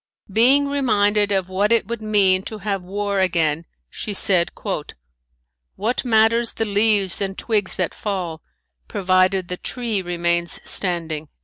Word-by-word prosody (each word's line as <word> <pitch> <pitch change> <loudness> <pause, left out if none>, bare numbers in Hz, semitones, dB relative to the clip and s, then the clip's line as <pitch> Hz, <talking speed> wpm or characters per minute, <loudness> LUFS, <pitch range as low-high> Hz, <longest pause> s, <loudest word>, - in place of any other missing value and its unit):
Being 265 +6 +4
reminded 210 -7 +1
of 190 -2 0
what 195 +3 0
it 230 -4 +3
would 235 -1 -5
mean 200 -3 +3
to 220 - -6
have 200 -1 -3
war 200 +2 -2
again 165 -4 +1 0.2
she 205 - -5
said: 180 -3 +3 1.2
"What 225 +5 -1
matters 230 0 +3
the 225 - -2
leaves 205 -2 +1
and 195 -1 -3
twigs 210 -5 0
that 185 -3 -2
fall, 180 -6 -4 0.5
provided 185 - +1
the 180 - -4
tree 230 -3 -3
remains 170 -1 -1
standing." 165 -5 -1
200 Hz, 135 wpm, -21 LUFS, 180-220 Hz, 1.2 s, Being